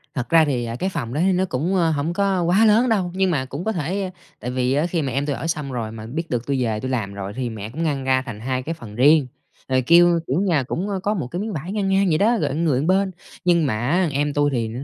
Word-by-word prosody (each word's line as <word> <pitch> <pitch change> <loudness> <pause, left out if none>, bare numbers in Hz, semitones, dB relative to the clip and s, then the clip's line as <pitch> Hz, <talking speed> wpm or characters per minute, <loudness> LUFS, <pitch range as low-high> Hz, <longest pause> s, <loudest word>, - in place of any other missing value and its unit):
Thật 125 -3 -3
ra 165 -1 +6
thì, 125 -5 -1
à, 115 - -4
cái 185 +9 -2
phòng 125 -9 -4
đó 150 - 0
thì 190 - +4
nó 185 +1 +1
cũng, 170 +5 -1
ơ, 170 -3 +3
hổng 155 +3 -1
có 195 -1 +1
quá 190 +6 +4
lớn 225 +4 +4
đâu, 190 -5 +1
nhưng 190 -1 +1
mà 130 -4 0
cũng 140 +6 -6
có 220 - +1
thể 185 +2 -2 0.3
tại 125 +3 -4
vì 130 +1 0
á 150 +4 +2
khi 170 -2 -1
mà 135 - -2
em 140 +3 -1
tui 145 -2 -1
ở - - -4
xong 150 -5 -3
rồi, 115 -3 -4
mà 110 -1 -8
biết 160 +8 -5
được 120 -1 -2
tui 135 -3 0
về 110 -2 -1
tui 130 +2 -4
làm 105 -6 -2
rồi 100 0 -6
thì 125 -2 -2
mẹ 110 -1 -6
cũng 160 +8 -4
ngăn 140 -4 -1
ra 130 0 +2
thành 120 -5 -8
2 130 +2 -2
cái 165 +4 -3
phần 110 -10 -11
riêng, 145 +2 +5 0.4
rồi 130 0 +2
kêu, 170 +4 +5
kiểu, 145 +9 +1
nhà 165 -9 +2
cũng 180 +10 -3 0.2
có 210 - +1
một 160 - -3
cái 175 - -5
miếng 215 -1 -4
vải 160 +6 -5
ngang 205 -2 -1
ngang 195 0 +3
vậy 155 - +3
đó, 225 +5 +3
rồi 135 - -1
người 160 -5 +1
một 150 +5 -1
bên. 190 +1 +2 0.3
Nhưng 170 -3 +4
mà 125 - 0
á, 170 +9 +1
em 145 +1 0
tui 145 0 +2
thì 115 -3 -1
150 Hz, 295 wpm, -22 LUFS, 130-180 Hz, 0.4 s, ra